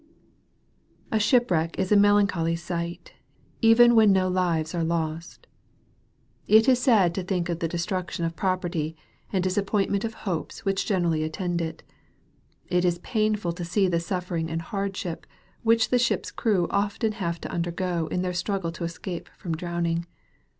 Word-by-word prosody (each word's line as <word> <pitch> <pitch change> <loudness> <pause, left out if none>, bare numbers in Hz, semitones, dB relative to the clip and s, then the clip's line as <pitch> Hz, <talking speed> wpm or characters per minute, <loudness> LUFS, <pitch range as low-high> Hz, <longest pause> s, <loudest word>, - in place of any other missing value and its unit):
A 220 - +2
SHIPWRECK 205 - +2
is 190 0 -1
a - - +6
melancholy 200 -5 +3
sight, 170 0 -5 0.5
even 240 +1 +7
when 220 -3 +6
no 185 -1 +3
lives 170 -3 0
are 170 -1 -1
lost. 165 0 -3 1.0
It 220 +3 +6
is 255 -2 +5
sad 215 -10 +4
to 190 - -3
think 180 -1 -2
of 170 -1 -2
the 165 - 0
destruction 175 0 -3
of 165 0 -3
property, 175 -4 -1 0.4
and 190 -3 0
disappointment 200 +1 0
of 225 -1 -3
hopes 175 -2 -4
which 195 0 0
generally 170 -5 +1
attend 170 +2 -2
it. 160 -1 -5 0.8
It 180 0 +1
is 175 -1 +2
painful 215 -5 0
to 175 - -6
see 190 +3 +1
the 170 -2 +1
suffering 170 -2 -3
and 165 +1 -3
hardship, 195 -2 -4 0.3
which 225 0 +3
the 250 - +3
ship's 240 - 0
crew 200 -6 +1
often 205 +2 0
have 170 -6 -3
to - - -6
undergo 170 -1 -2
in 180 - -2
their 180 -1 -2
struggle 180 -1 -2
to 170 - -7
escape 170 +1 -5
from 170 - -4
drowning. 170 0 -2
180 Hz, 155 wpm, -26 LUFS, 170-205 Hz, 1.0 s, even